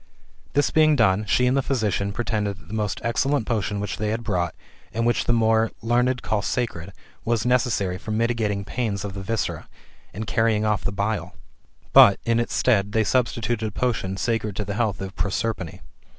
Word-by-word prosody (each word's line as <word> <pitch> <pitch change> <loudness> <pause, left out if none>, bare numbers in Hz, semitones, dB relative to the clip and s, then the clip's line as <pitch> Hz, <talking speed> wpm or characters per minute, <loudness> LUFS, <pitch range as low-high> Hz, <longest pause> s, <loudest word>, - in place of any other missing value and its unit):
This 145 +2 +2
being 155 -1 +5
done, 105 -4 +3
she 125 +4 +2
and 125 +1 +2
the 135 - +3
physician 105 -7 -1
pretended 105 -3 -2
that 85 - -18
the - - -8
most 105 -2 -2
excellent 130 +2 +1
potion 105 -3 -1
which 105 - -3
they 105 0 -1
had 115 +2 -2
brought, 90 -6 -1 0.4
and 115 +2 -1
which 120 - +1
the - - +2
more 115 -1 +3
learned 125 +2 +1
called 105 -2 -1
sacred, 100 -8 -2 0.3
was 115 -1 0
necessary 115 -7 +1
for 110 - -10
mitigating 110 -3 0
pains 105 -3 -2
of 100 - -5
the 100 - -6
viscera, 110 +3 -3 0.4
and 110 +3 -5
carrying 110 -1 +1
off 105 -2 0
the - - -1
bile 100 +2 -2 0.3
\ - - -34
but, 100 -1 +8
in 115 0 +2
its 120 - -2
stead, 105 -5 +2
they 110 - +3
substi 120 +1 0
tuted 110 0 -1
a - - -2
potion 105 -5 -1
sacred 110 -2 -1
to 105 - -3
the 100 - -3
health 105 -3 -1
of 95 -1 -6
Prosperine. 100 -4 -2
110 Hz, 195 wpm, -24 LUFS, 100-120 Hz, 0.4 s, but